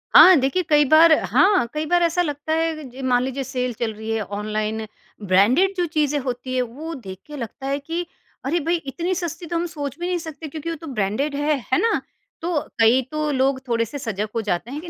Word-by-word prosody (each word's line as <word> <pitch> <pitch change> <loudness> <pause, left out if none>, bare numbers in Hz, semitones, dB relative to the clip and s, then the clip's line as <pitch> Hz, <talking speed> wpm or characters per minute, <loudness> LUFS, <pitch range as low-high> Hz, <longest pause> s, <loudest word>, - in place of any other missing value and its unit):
हाँ, 375 - +10
देखिए 275 +8 +1
कई 295 -1 +5
बार 320 +1 +7 0.2
हाँ, 385 - +4
कई 305 +1 -2
बार 350 +2 +2
ऐसा 340 +1 +2
लगता 295 -1 -2
है 325 0 +1
अग 275 -4 -9
जी, 265 +2 -9
मान 250 -1 +2
लीजिए 265 +1 -3
सेल 250 -1 -2
चल 230 -2 0
रही 220 +1 -8
है, 225 -1 0
ऑनलाइन 215 +1 -3 0.4
ब्रांडेड 235 - +3
जो 355 - +2
चीज़ें 300 -2 0
होती 255 -1 -4
हैं 255 - +2
वो 285 +8 -6
देख 190 -2 -8
के 295 -1 -8
लगता 255 +3 -6
है 280 +1 0
कि, 330 +5 -4 0.4
अरे 335 +5 +1
भई 330 +3 0
इतनी 335 +3 -3
सस्ती 340 -1 -4
तो 335 - -4
हम 335 +1 0
सोच 290 -4 -5
भी 350 - -2
नहीं 360 -1 0
सकते 320 -1 -7
क्योंकि 310 +2 -6
वो 330 - -2
तो 320 +1 -10
ब्रांडेड 215 +8 -1
है, 295 +1 +1 0.2
है - - +4
ना? 455 - +2 0.4
तो 335 -2 0 0.2
कई 230 +4 +5
तो 305 -1 -1
लोग 265 0 +1
थोड़े 230 -1 +1
से 255 +6 -7
सजग 215 -4 -3
हो 230 - +1
जाते 210 +3 -2
हैं 295 +2 -5
कि 345 - -9
285 Hz, 235 wpm, -22 LUFS, 240-330 Hz, 0.4 s, हाँ